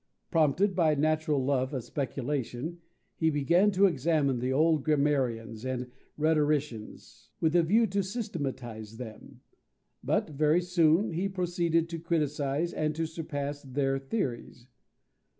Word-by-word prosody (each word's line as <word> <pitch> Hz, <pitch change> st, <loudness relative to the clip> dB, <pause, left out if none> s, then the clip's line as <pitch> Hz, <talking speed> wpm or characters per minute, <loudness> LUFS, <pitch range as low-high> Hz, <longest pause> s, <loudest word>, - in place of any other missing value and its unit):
Prompted 170 Hz, +4 st, +2 dB
by 160 Hz, -4 st, +3 dB
a 145 Hz, -, -2 dB
natural 155 Hz, -3 st, +1 dB
love 130 Hz, 0 st, 0 dB
of 130 Hz, -, -3 dB
speculation, 140 Hz, +3 st, -3 dB, 0.4 s
he 160 Hz, -, +2 dB
began 170 Hz, +7 st, +3 dB
to 195 Hz, 0 st, +4 dB
examine 150 Hz, -5 st, +1 dB
the 125 Hz, +2 st, -1 dB
old 155 Hz, +1 st, +3 dB
grammarians 130 Hz, -7 st, 0 dB
and 125 Hz, -1 st, -3 dB, 0.3 s
rhetoricians, 150 Hz, -7 st, -1 dB
with 160 Hz, +1 st, +1 dB
a 175 Hz, -, +6 dB
view 215 Hz, +8 st, +3 dB
to 200 Hz, -1 st, 0 dB
systematize 135 Hz, -, -5 dB
them. 110 Hz, -3 st, -10 dB, 0.6 s
But -, -, 0 dB
very 155 Hz, +4 st, +3 dB
soon 175 Hz, +2 st, +3 dB
he 180 Hz, +4 st, -1 dB
proceeded 175 Hz, -3 st, 0 dB
to 165 Hz, -1 st, -5 dB
criticize 150 Hz, -1 st, -1 dB
and 155 Hz, -1 st, -1 dB
to 165 Hz, +1 st, -1 dB
surpass 145 Hz, -3 st, -4 dB
their 135 Hz, 0 st, -1 dB
theories. 135 Hz, -, -4 dB
150 Hz, 130 wpm, -29 LUFS, 135-170 Hz, 0.6 s, a